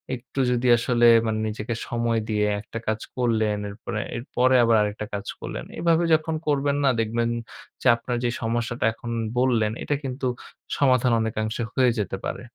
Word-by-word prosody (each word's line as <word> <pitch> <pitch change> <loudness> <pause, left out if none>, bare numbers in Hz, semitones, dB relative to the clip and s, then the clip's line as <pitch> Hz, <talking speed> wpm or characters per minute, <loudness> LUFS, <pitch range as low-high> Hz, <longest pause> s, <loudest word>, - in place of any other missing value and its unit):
একটু 125 +2 -8
যদি 125 0 +1
আসলে 120 +1 +2 0.2
মানে 110 0 -1
নিজেকে 110 +2 -4
সময় 115 -1 0
দিয়ে 105 -1 +1 0.2
একটা 110 +2 -7
কাজ 110 0 -1 0.2
করলেন, 110 -4 +1
এরপরে, 105 +2 -5 0.2
এরপরে 130 +1 +1
আবার 115 -1 +4
আরেকটা 105 0 -2
কাজ 100 -1 -4
করলেন - - -6
এভাবে 170 0 +3
যখন 160 0 +1
করবেন 140 -1 +1
না, - - +4
দেখবেন 115 +1 0 0.5
যে, - - 0
আপনার 115 +1 -4
যে, 120 - +2
সমস্যাটার 120 +1 -2
কথা 110 0 +3
এখন 120 +1 -7 0.3
বললেন, 120 -4 +2
এটা 145 - 0
কিন্তু 130 0 -4 0.5
সমাধান 130 -3 +3
অনেকাংশে 110 +1 -2
হয়ে 130 -2 +4
যেতে 95 -2 -2
পারে। - - -4
115 Hz, 165 wpm, -24 LUFS, 110-130 Hz, 0.5 s, আবার